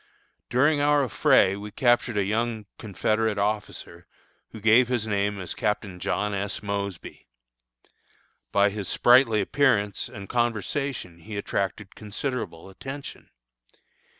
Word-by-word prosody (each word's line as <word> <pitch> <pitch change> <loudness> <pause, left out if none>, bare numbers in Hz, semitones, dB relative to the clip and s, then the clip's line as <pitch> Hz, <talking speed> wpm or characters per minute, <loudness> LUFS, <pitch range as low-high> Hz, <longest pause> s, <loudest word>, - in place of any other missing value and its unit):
During 145 +4 +3
our 145 0 +4
affray 130 -7 +4
we 105 +1 -7
captured 120 -1 +2
a 100 - +3
young 110 +2 -1
Confederate 110 +1 0
officer, 100 -4 -3 0.4
who 110 - -10
gave 115 +4 +5
his 120 -3 -1
name 100 -1 -1
as 90 -2 -5
Captain 100 -3 -2
John 105 +3 -1
S. 100 +1 -3
Mosby. 100 -2 -5 1.2
By 100 0 +3
his 100 -2 -5
sprightly 120 -3 +5
appearance 105 -4 +1
and 100 -1 -9
conversation 120 - -2
he 105 +4 -7
attracted 100 0 -3
considerable 105 -5 -5
attention. 135 +8 -9
105 Hz, 120 wpm, -26 LUFS, 100-120 Hz, 1.2 s, gave